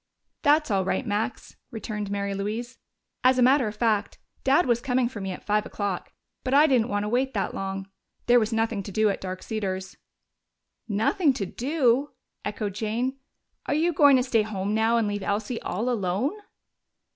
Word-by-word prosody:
"That's 300 -3 +3
all 195 -1 +2
right, 190 - -1
Max," 220 +4 -3
returned 215 -2 -5
Mary 200 0 -2
Louise. 220 +5 -4 0.4
"As 255 0 +5
a 250 - +4
matter 260 -1 +4
of 210 - -5
fact, 215 -2 0 0.3
Dad 280 +6 +4
was 240 -1 +2
coming 250 -1 +1
for 230 -4 -7
me 190 0 -3
at 180 - -8
five 210 0 +2
o'clock, 200 -4 -4 0.3
but 265 +1 +1
I 295 +2 +7
didn't 250 -6 +3
want 205 0 0
to - - -2
wait 255 +3 0
that 200 - -1
long. 195 0 -4 0.4
There 245 0 +6
was 220 0 -1
nothing 225 -2 0
to 200 - -8
do 215 +2 +3
at - - -5
Dark 185 0 -5
Cedars." 190 -3 -4 0.9
"Nothing 235 - +2
to 200 - -3
do?" 270 - +1 0.3
echoed 205 -1 -3
Jane. 230 +6 -2 0.5
"Are - - +1
you 335 +3 +2
going 285 -3 +6
to 250 - +2
stay 240 -3 +2
home 205 -1 -2
now 225 +2 +3
and 225 -2 +1
leave 205 0 -2
Elsie 210 +4 -2
all 220 +7 -2
alone?" 220 - 0
220 Hz, 185 wpm, -26 LUFS, 205-255 Hz, 0.9 s, I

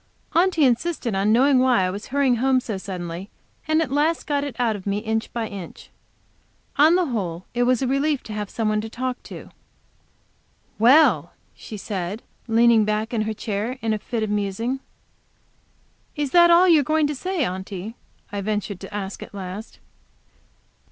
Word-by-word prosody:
Aunty 340 -3 +3
insisted 250 -1 0
on 195 +2 +2
knowing 260 +3 +5
why 255 -6 +3
I 185 - 0
was 205 +3 -7
hurrying 270 -3 +2
home 260 +2 +3
so 225 -4 -5
suddenly, 180 -1 -6 0.4
and 315 +1 +3
at 265 - -6
last 305 +4 +1
got 285 -2 0
it 285 -3 -5
out 235 -3 +1
of 200 -1 -8
me 200 0 0
inch 220 +1 -2
by 230 -2 -3
inch. 195 -5 -10 0.9
On 310 +4 +6
the 365 -1 +2
whole 185 - -3
it 245 0 +1
was 255 +1 +2
a - - 0
relief 275 +2 0
to 215 - -8
have 210 -1 -4
some 225 -2 -2
one 215 0 +1
to 220 - -6
speak 250 +2 -4
to. - - -10 1.3
"Well!" 235 - +5 0.2
she 215 - -9
said, 195 +1 -4 0.2
and 225 - -2
leaned 230 -2 +5
back 215 +2 -1
in 225 - +1
her 220 +1 -2
chair 215 +4 -3
in 225 -1 +1
a 215 - -2
fit 225 +1 -3
of 215 - -2
musing. 210 +6 -1 1.4
"Is 290 -3 -2
that 345 -1 +7
all 345 +2 +6
you 330 -3 +6
are - - +1
going 310 +2 +2
to 295 - -1
say, 355 +1 -2
Aunty?" 190 +3 -5 0.4
I 200 -1 -3
ventured 205 -2 -3
to 195 - -9
ask 200 -1 -5
at - - -10
last. 195 +3 -7
225 Hz, 185 wpm, -23 LUFS, 205-275 Hz, 1.4 s, that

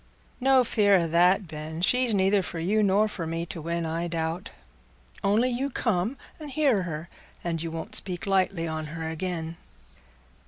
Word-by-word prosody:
"No 265 0 +5
fear 210 -4 +4
o' 175 -3 +3
that, 180 +4 +4
Ben; 155 +2 -6
she's 250 +3 +3
neither 195 0 +3
for 175 - -6
you 195 +7 +1
nor 205 +1 +4
for 180 -6 -5
me 165 +1 -2
to 165 - -7
win, 170 +1 -2
I 165 +2 -2
doubt. 165 +3 -2 0.7
Only 215 +5 +3
you 260 +3 -1
come 225 -1 0 0.2
and 305 -2 -7
hear 270 -7 +2
her, 165 -2 -5 0.4
and 165 -2 -2
you 165 - -3
won't 165 +7 -6
speak 180 -4 -2
lightly 190 -3 +1
on 155 -1 -3
her 160 +1 -5
again." 165 0 -3
180 Hz, 170 wpm, -27 LUFS, 165-210 Hz, 0.7 s, No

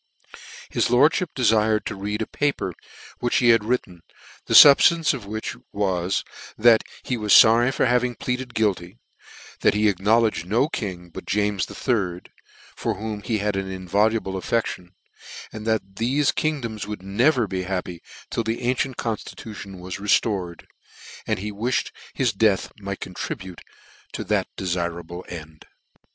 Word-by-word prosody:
His - - +1
lordfhip 150 +8 +3
defired 110 -3 +2
to - - -4
read 105 +3 -3
a - - -5
paper 145 -11 -2 0.5
which 120 - -1
he 120 - +4
had 115 -2 +5
written, 105 -7 -2 0.5
the - - +1
fubftance 160 +3 +8
of 120 -7 -7
which 110 +1 -4 0.2
was, 95 -2 -1 0.3
that 115 0 +6 0.2
he 125 - -2
was 105 -2 +1
forry 120 +3 +7
for - - +1
having 125 0 +1
pleaded 125 0 -4
guilty; 100 -3 -1 0.6
that - - +3
he 105 +1 +3
acknowledged 105 -1 +1
no 115 +8 +2
king 90 - -5
but - - -9
James 105 -2 0
the - - -10
Third, 95 -8 -2 0.4
for - - -2
whom 105 0 -5
he 110 +1 -1
had 105 -1 -1
an 95 0 -3
inviolable 95 +3 0
affedHon, 100 -4 -2 0.7
and 110 0 -7
that 110 -1 +1
thefe 130 +7 +1
kingdoms 120 -9 -2
would 105 -3 -6
never 115 +6 +2
be 95 -2 -3
happy 90 -2 -4 0.3
till 115 - -1
the 115 +1 -3
ancient 125 +1 -1
constitution 105 -3 -6
was 90 0 -6
reltored; 100 -4 0 0.6
and - - 0
he 105 +3 -5
wifhed 120 +5 -1 0.2
his 125 -5 +1
death 100 -1 +1
might 100 -1 -6
contribute 95 0 -6 0.5
to - - -4
that - - 0
defirable 85 -1 -3
end. 80 -2 -10
105 Hz, 150 wpm, -23 LUFS, 95-120 Hz, 0.7 s, fubftance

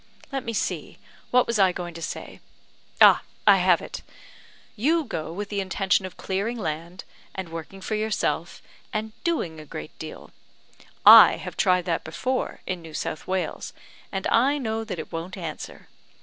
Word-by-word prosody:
Let 270 -2 -2
me 230 - -3
see; - - -3 0.3
what 250 0 +4
was 235 -2 -1
I 190 -2 +5
going 175 -1 -6
to 165 - -9
say? - - -6 0.6
ah, - - +8 0.2
I - - +8
have - - +3
it! - - -7 0.7
You 310 +9 +2
go 165 - -5
with 200 +4 -5
the 205 - -2
intention 190 0 +1
of 180 - -14
clearing 200 +5 -2
land, 170 -1 -5 0.3
and 190 -3 -5
working 165 +4 -8
for 205 - -4
yourself, 215 0 -1 0.3
and 220 -1 -3
doing 175 - -1
a - - -8
great 155 +1 -8
deal. 155 - -9 0.7
I - - +10
have - - -7
tried 180 -2 +2
that 170 -2 -1
before 255 +11 -3
in 180 -2 -3
New 160 -2 -10
South 155 - -4
Wales, 190 -1 -3 0.4
and 195 -1 -3
I 270 +5 +4
know 225 -4 -2
that 215 -5 -5
it 160 - -7
won't 170 +3 -5
answer. 165 -4 -7
190 Hz, 170 wpm, -25 LUFS, 170-220 Hz, 0.7 s, I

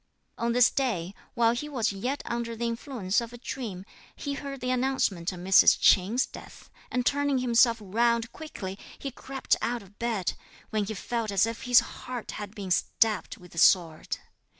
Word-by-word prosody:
On 235 0 -1
this 245 -1 +5
day, 200 -10 -1 0.2
while 230 -1 +4
he 295 +5 -4
was 250 -8 0
yet 250 +9 -3
under 235 -1 -3
the 235 +1 -3
influence 230 -4 -1
of 235 0 -7
a - - -8
dream, 225 -7 -6 0.3
he 285 - -4
heard 275 -1 -6
the 250 0 -1
announcement 250 -9 0
of 180 - -8
Mrs. 190 +1 +6
Ch'in's 215 +8 +4
death, - - -13 0.2
and 250 -1 -1
turning 285 0 +2
himself 240 -1 +4
round 230 +3 +1
quickly 195 -11 -7 0.2
he 275 - -5
crept 265 +1 -1
out 235 0 -1
of 200 +1 -20
bed, 225 -6 -1 0.4
when 215 -1 0
he 220 +2 -5
felt 230 +3 -3
as 200 0 +3
if 230 +2 -5
his 245 -1 +7
heart 250 -3 -7
had 210 0 -7
been 195 -3 -6
stabbed 215 +3 +1
with 180 -1 -15
a 170 - -3
sword. 165 -3 +3
235 Hz, 180 wpm, -28 LUFS, 200-250 Hz, 0.4 s, his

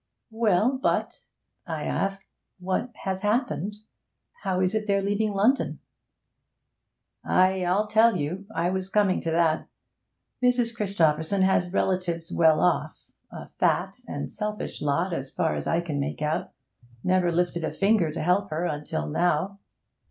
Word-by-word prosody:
'Well, 225 +3 +2
but,' - - -1 0.4
I - - -3
asked, 195 0 -2 0.3
'what 190 +6 -2
has 190 -1 -2
happened. 210 - 0 0.7
How 185 -1 -1
is 185 +1 +1
it 215 -1 -1
they're 200 -1 +3
leaving 205 +1 0
London?' 225 +8 +2 1.5
'Ay, 185 0 +3
I'll 185 +4 +2
tell 220 0 +4
you; 180 +6 -4
I 175 +2 +1
was 190 0 -3
coming 200 -2 +2
to 165 - -2
that. 165 -1 +1 0.7
Mrs. 245 -2 +2
Christopherson 190 -3 +1
has 180 -2 +2
relatives 180 -3 -1
well 160 -2 +4
off 180 - 0 0.3
a - - -8
fat - - 0
and - - -5
selfish 210 0 -4
lot, 165 +5 0
as 135 -4 -4
far 165 -2 0
as - - -4
I 165 - +2
can 155 -4 -3
make 145 +2 -3
out 150 +1 -1 0.5
never 185 -1 +2
lifted 175 0 0
a - - -1
finger 195 -5 +2
to 155 - -4
help 185 +4 +2
her 160 +3 -2
until 150 - -3
now. 175 - 0
185 Hz, 145 wpm, -26 LUFS, 165-205 Hz, 1.5 s, tell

